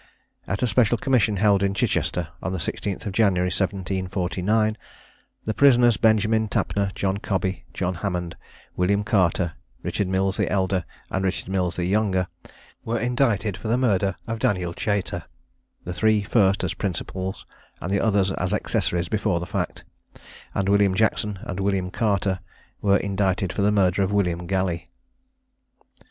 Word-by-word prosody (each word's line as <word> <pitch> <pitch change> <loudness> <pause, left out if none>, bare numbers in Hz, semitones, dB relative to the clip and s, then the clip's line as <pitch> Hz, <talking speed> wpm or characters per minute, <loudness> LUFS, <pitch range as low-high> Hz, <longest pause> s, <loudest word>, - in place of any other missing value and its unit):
At 100 - -2
a - - +3
special 120 0 +3
commission 110 -4 +2
held 100 0 +4
at 100 0 +1
Chichester, 90 -4 0
on 95 - -2
the - - -1
16th 95 +4 -3
of 100 - -3
January 95 -4 +2
1749, 95 +3 0 0.7
the 110 - -1
prisoners 120 -4 +5
Benjamin 110 0 +3
Tapner, 100 -1 0
John 95 0 0
Cobby, 95 -3 -2
John 95 0 -2
Hammond, 90 -2 -3 0.4
William 100 +3 +2
Carter, 90 -5 +1 0.3
Richard 100 - -1
Mills 95 +1 0
the - - +1
elder, 95 -2 +1 0.3
and 95 - -1
Richard 95 -1 -2
Mills 90 -2 0
the 90 - -1
younger, 95 -1 +1 0.6
were 115 0 -1
indicted 115 -5 +1
for 110 - -7
the 115 +3 +2
murder 100 -7 +2
of 115 -1 -4
Daniel 90 -5 0
Chater; 100 -3 -2 0.6
the 90 - -5
three 110 +1 +2
first 100 -2 +3
as 90 - -1
principals, 95 0 -4 0.3
and 90 - -4
the 100 - +2
others 100 -3 +2
as 90 -1 -1
accessories 85 -1 0
before 105 -4 0
the 85 - -4
fact; 95 -3 -3 0.7
and 100 - 0
William 100 -1 +4
Jackson 105 -1 +1
and 90 - -5
William 95 -2 0
Carter 100 -3 0 0.4
were 100 -1 +4
indicted 95 -2 0
for - - -1
the 105 +1 +3
murder 95 -2 +3
of 95 0 +1
William 90 -4 0
Galley. 90 -3 -1
100 Hz, 155 wpm, -24 LUFS, 90-105 Hz, 0.7 s, prisoners